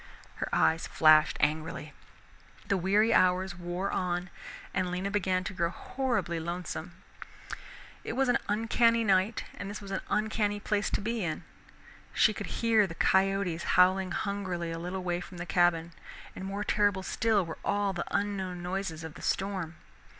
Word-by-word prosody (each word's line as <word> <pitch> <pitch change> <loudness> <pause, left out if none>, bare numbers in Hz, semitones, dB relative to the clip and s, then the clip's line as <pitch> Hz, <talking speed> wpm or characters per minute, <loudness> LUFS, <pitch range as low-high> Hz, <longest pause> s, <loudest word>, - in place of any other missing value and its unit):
Her - - -3
eyes 160 +1 +2
flashed 155 -1 +5
angrily. 155 0 -1 0.7
The 200 - +2
weary 205 +5 +3
hours 185 0 +3
wore 175 +2 -3
on 180 0 -2 0.4
and 185 -1 0
Lena 185 +2 -2
began 185 -2 +1
to 185 - -5
grow 170 -2 0
horribly 240 -4 -2
lonesome. 170 0 -5 1.1
It - - -4
was 265 +2 +1
an 245 - +3
uncanny 230 +2 +3
night 195 +1 +2
and 200 - -6
this 205 - -5
was 200 -2 -9
an 190 - -2
uncanny 210 -1 0
place 210 0 0
to - - -1
be 225 0 -2
in. 160 -3 -3 0.7
She - - +4
could - - -5 0.2
hear 220 -3 +4
the 165 - -8
coyotes 190 -3 +2 0.2
howling 185 +1 +5
hungrily 185 -3 -3
a 165 - -4
little 180 +2 -4
way 175 -1 -1
from 180 0 -10
the 175 - -5
cabin, 170 -2 +2 0.4
and 190 - -6
more 200 +2 -3
terrible 205 -3 +1
still 215 -1 +1
were 165 - -7
all 205 -1 0
the 175 - -3
unknown 190 -3 -2
noises 180 -3 -3
of 160 -1 -7
the - - -12
storm. 190 -4 -2
190 Hz, 165 wpm, -30 LUFS, 175-205 Hz, 1.1 s, flashed